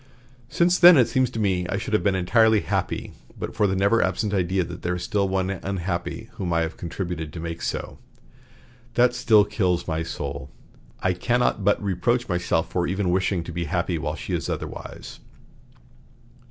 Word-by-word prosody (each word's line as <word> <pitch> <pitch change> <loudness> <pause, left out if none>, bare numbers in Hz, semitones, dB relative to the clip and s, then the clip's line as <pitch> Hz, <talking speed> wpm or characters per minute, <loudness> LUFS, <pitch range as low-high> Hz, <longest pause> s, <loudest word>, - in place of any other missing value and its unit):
Since 175 +1 +2
then 175 -2 +9
it 125 -3 +5
seems 130 +1 +1
to 125 - -8
me 95 -4 0
I 100 - -1
should 110 - -5
have 105 - +3
been 100 -2 +1
entirely 110 +3 +4
happy, - - -2 0.2
but - - -6
for 105 -2 +3
the 95 - 0
never 100 +4 +3
absent 105 -2 0
idea 95 -1 +1
that - - -8
there 90 +1 -1
is 90 - -5
one 95 -2 +1
still 95 -3 -4
unhappy 95 +4 -3
whom 95 -6 -4
I 85 0 +2
have 80 0 -3
contributed 85 -2 -5
to 85 - -8
make 85 0 -5
so. - - -4 1.0
That 120 0 +4
still 110 -5 +4
kills 95 -4 0
my 80 -1 -1
soul. 70 -4 -5 0.5
I 95 - +1
cannot 120 +2 0
but 100 +1 +3
reproach 120 +6 0
myself 85 -2 0
for 90 -1 0
even 95 0 0
wishing 95 -1 0
to 85 - -7
be 85 0 -3
happy 85 +1 -1
while 75 -1 -3
she - - -6
is - - -2
otherwise." - - -6
95 Hz, 185 wpm, -24 LUFS, 85-110 Hz, 1.0 s, then